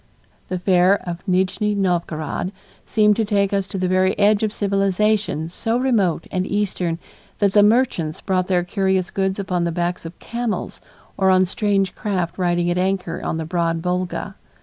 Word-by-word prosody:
The 185 - -2
fair 180 +1 +4
of 175 0 -4
Nijni 190 +3 +1
Novgorod 175 -2 -1 0.4
seemed 210 -1 +4
to 225 - +2
take 200 -2 +1
us 195 -1 0
to 195 - -5
the 185 0 0
very 185 +1 +2
edge 205 0 +4
of 215 -1 0
civilization 200 -3 0
so 225 +7 -1
remote 220 -11 +1
and 185 -1 0
eastern 190 -5 -1 0.4
that 200 -2 +2
the 205 - +6
merchants 205 -8 +2
brought 185 -1 0
their 180 -2 +2
curious 190 0 0
goods 190 -1 -1
upon 180 -3 -1
the 170 - 0
backs 175 +1 -2
of 165 +1 -9
camels 235 -2 -4 0.4
or 190 -1 +3
on 185 0 +5
strange 195 0 0
craft 185 -4 -3
riding 175 -1 +1
at 175 - 0
anchor 185 -2 -1
on - - -2
the 160 - -3
broad 165 -1 -1
Volga. 180 +2 -2
190 Hz, 170 wpm, -21 LUFS, 175-205 Hz, 0.4 s, the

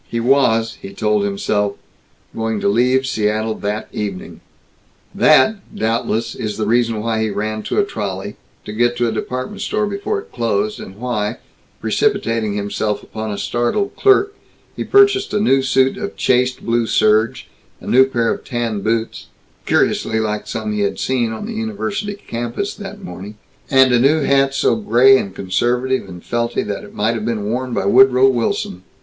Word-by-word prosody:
He 115 - -2
was, 115 -3 +2
he 100 0 -9
told 105 -1 +1
himself, 100 0 -1 0.6
going 110 -1 -2
to - - +1
leave 125 +5 +2
Seattle 110 -1 0
that 105 +2 -3
evening. 100 -3 -5 0.7
That, 155 +9 +4 0.2
doubtless, 115 0 -1
is 105 -1 -4
the 110 - -1
reason 115 -1 +1
why 110 -1 0
he 110 - 0
ran 110 +2 -3
to - - -4
a 205 - +3
trolley, 100 - -5 0.3
to 105 - -6
get 120 +2 +1
to 120 - +1
a - - 0
department 130 - -4
store 215 0 0
before 205 - -2
it - - -13
closed; 110 -3 -1
and 95 - -9
why, 115 -2 -2 0.4
precipitating 115 - 0
himself 100 +1 -2
upon 110 0 -6
a 100 - -4
startled 120 - -1
clerk, 400 0 +3 0.4
he - - -3
purchased 400 - +3
a - - +2
new 135 -10 +3
suit 130 0 +2
of 200 - -5
chaste 125 0 +1
blue 115 0 +1
serge, 110 +1 +2 0.3
a - - -14
new 130 +2 +5
pair 120 -3 0
of - - -9
tan 115 -4 -3
boots 115 +2 -2 0.4
(curiously 110 - +1
like 105 -1 -2
some 110 -2 -3
he 105 - -2
had 100 -1 0
seen 120 -3 0
on 110 - -5
the 230 - -5
university 210 -2 -3
campus 120 +3 -4
that 205 0 -9
morning) 105 - -9 0.3
and 130 -2 +5
a 120 - +4
new 145 +5 +3
hat 135 0 +2
so - - +2
gray 135 - +5
and 95 -1 -6
conservative 120 +5 -1
and 90 -1 -10
felty 120 0 -1
that 100 -1 -4
it - - -13
might 110 +3 +1
have 110 -2 -4
been 115 -2 -2
worn 125 +4 -2
by 105 - -1
Woodrow 130 +4 +6
Wilson. 115 -7 -1
115 Hz, 175 wpm, -18 LUFS, 105-130 Hz, 0.7 s, Woodrow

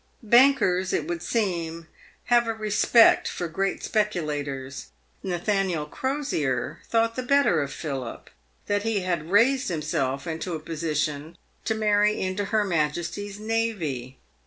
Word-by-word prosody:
Bankers, 225 -6 +4
it 155 - -1
would 170 -1 -3
seem, 170 -6 -2 0.4
have 240 -1 +3
a 225 - -1
respect 220 +2 +4
for 175 - -3
great 195 +4 -2
speculators. 145 - -2 0.3
Natha 195 +2 0
niel 170 -6 -2
Crosier 160 - -2
thought 230 0 +2
the 255 - -2
better 255 - +3
of 140 0 -3
Philip 135 -6 -6 0.3
that 205 0 0
he 220 -2 0
had 170 -3 -2
raised 250 +7 +4
himself 150 -4 -2
into 165 +1 -4
a - - -4
position 155 0 -3 0.3
to 220 - 0
marry 210 -1 +2
into 190 +2 -2
her 215 +1 +1
Majesty's 175 +4 -2
navy. 195 - -2
180 Hz, 135 wpm, -25 LUFS, 155-220 Hz, 0.4 s, Bankers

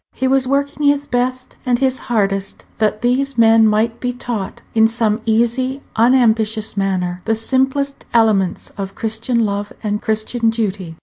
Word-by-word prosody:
He 260 - -1
was 265 -1 +2
working 280 +2 0
his 285 0 +2
best 255 0 -2
and 245 -1 +1
his 260 0 0
hardest 195 -3 -1
that 215 0 0
these 260 +2 0
men 225 -1 +5
might 220 +2 +1
be 250 - -2
taught, 240 -5 -5
in 220 0 +5
some 225 -1 0
easy, 240 +4 0
unambitious 225 -3 +2
manner, 185 -2 -1
the 225 - +1
simplest 265 +4 -1
elements 215 -6 +1
of 195 0 -5
Christian 225 +1 0
love 205 0 -3
and 210 -1 -2
Christian 220 +2 0
duty. 200 -7 -3
225 Hz, 150 wpm, -18 LUFS, 215-255 Hz, -, men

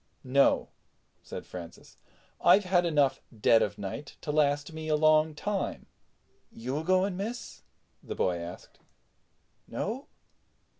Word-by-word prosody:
"No," 140 +1 +3 0.5
said - - -8
Francis, 85 -2 -10 0.5
"I've 205 - +7
had 180 -1 +2
enough 145 -4 +2 0.2
dead 115 +2 +5
of 100 - -1
night 100 +9 -6
to 150 - -3
last 145 0 +1
me 160 0 -6
a 155 - +3
long 155 0 +4
time." 205 +4 -3 0.7
"You 130 +5 -4
a - - -4
going, 185 +2 +2
miss?" 225 +6 -5 0.4
the - - -6
boy 90 -2 +1
asked. 85 +1 -9 0.9
"No? 235 +7 -4
155 Hz, 130 wpm, -29 LUFS, 130-180 Hz, 0.9 s, I've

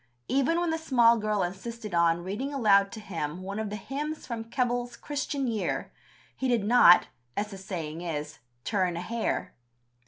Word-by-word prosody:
Even 275 +6 +2
when 345 -1 0
the 320 - -1
small 240 -7 +5
girl 210 -2 0
insisted 210 +3 -5
on 170 0 +3
"reading 210 +10 -3
aloud 200 -7 +4
to 230 - -7
him 175 -4 -4
one 200 +3 -4
of 220 -1 -2
the 210 - -4
hymns 295 +8 -4
from 230 -2 -5
Keble's 245 -1 -1
Christian 285 -1 -3
Year," 225 -4 -2 0.4
he 265 - -2
did 240 -4 +2
not, 205 -5 +7 0.3
as 210 +1 -1
the 195 - -7
saying 170 -4 -5
is, 150 -3 -4 0.2
turn 185 -5 0
a - - -3
hair. 230 +5 -2
215 Hz, 175 wpm, -28 LUFS, 185-245 Hz, 0.4 s, not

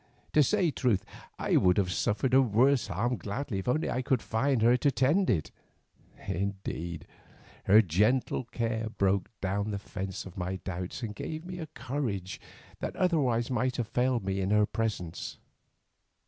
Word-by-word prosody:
To 150 - +6
say 180 +2 +2
truth, 110 -7 +1 0.3
I - - +2
would 90 -1 +4
have 95 -3 +1
suffered 105 - 0
a 135 - +7
worse 125 +2 +3
harm 115 +6 -1
gladly, 105 +3 -3
if 95 - -7
only 140 +6 +1
I 130 - -1
could 130 -2 0
find 115 +1 +1
her 120 +2 +6
to 145 - +2
tend 140 +9 +2
it. 80 -9 0 0.8
Indeed, 90 -4 -3 0.6
her 105 +3 +7
gentle 105 +9 +1
care 115 -1 -2
broke 100 -2 +1
down 100 +2 -1
the 100 - -2
fence 95 -1 -5
of 95 -1 -9
my 90 +2 -2
doubts 90 +4 -5
and 110 -2 -3
gave 155 +9 -6
me 180 0 -6
a 160 - -5
courage 120 - -4 0.4
that - - -4
otherwise 135 -11 +1
might 125 +1 0
have 115 -3 -2
failed 125 -4 +1
me 95 0 -1
in 95 - -1
her 105 0 +4
presence. 105 -7 -3
110 Hz, 165 wpm, -29 LUFS, 95-130 Hz, 0.8 s, a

